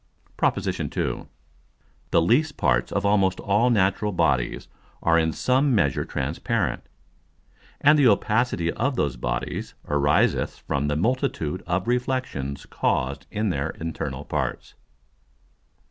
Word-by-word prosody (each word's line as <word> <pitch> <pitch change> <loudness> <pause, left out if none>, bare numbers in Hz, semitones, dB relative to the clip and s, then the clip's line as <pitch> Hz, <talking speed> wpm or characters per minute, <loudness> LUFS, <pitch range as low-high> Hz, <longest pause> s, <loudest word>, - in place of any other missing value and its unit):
PROP. - - +1
II. - - -3
_The - - -2 1.0
least 150 - +2
parts - - +1
of - - -1
almost 95 -2 +2
all 105 +5 +2
natural 105 -1 +2
Bodies 75 -9 0 0.4
are 85 0 +4
in 80 0 +1
some 130 - +2
measure 70 -9 +1
transparent: - - -2 1.0
And 150 +2 +6
the 135 - +6
Opacity 105 -4 +2
of 135 +3 -1
those 70 - 0
Bodies - - -4
ariseth 75 0 +2
from 70 +1 0
the 75 - 0
multitude 95 - -1
of 90 +3 -1
Reflexions 125 - -2
caused 70 +1 -1
in 105 0 -1
their 70 -3 -1
internal 80 -1 -4
Parts. - - -3
95 Hz, 120 wpm, -24 LUFS, 75-120 Hz, 1.0 s, And